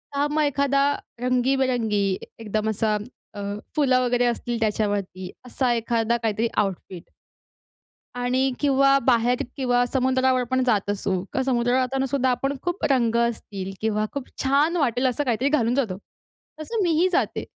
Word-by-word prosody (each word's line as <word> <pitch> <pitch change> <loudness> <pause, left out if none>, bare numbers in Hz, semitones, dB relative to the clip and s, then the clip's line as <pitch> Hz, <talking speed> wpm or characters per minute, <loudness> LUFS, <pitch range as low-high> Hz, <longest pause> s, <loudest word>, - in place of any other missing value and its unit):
तर 285 +1 +2
मग 310 0 +1
एखादा 280 -1 +2 0.4
रंगीबेरंगी 250 -5 +1 0.3
एकदम 215 0 -2
असा 215 0 0 0.4
अ, 205 - -8 0.4
फुलं 265 -4 +3
वगैरे 245 0 +1
असतील 240 0 -2
त्याच्यावरती, 205 -4 -1 0.2
असा 250 0 0
एखादा 230 0 0
काहीतरी 220 +1 0
आउटफिट. 185 -2 -2 1.1
आणि 255 +2 +1
किंवा 275 -1 +4
बाहेर 245 +1 +2
किंवा 245 -2 +2
समुद्रावर 260 0 +1
पण 260 0 +2
जात 210 -5 +1
असू, 200 -1 -2 0.2
का 265 - 0
समुद्रावर 245 -1 +1
जातानासुद्धा 265 0 0
आपण 270 +3 -1
खूप 350 -1 -3
रंग 235 -4 +2
असतील 215 -5 -2
किंवा 215 -1 0
खूप 280 -2 -5
छान 285 +6 +2
वाटेल 255 -4 +1
असं 255 +4 0
काहीतरी 250 +2 +1
घालून 245 -5 +1
जातो, 230 -10 -1 0.6
तसं 435 +7 -2
मी 350 - +2
ही 365 - +4
जाते. - - 0
245 Hz, 145 wpm, -24 LUFS, 225-270 Hz, 1.1 s, किंवा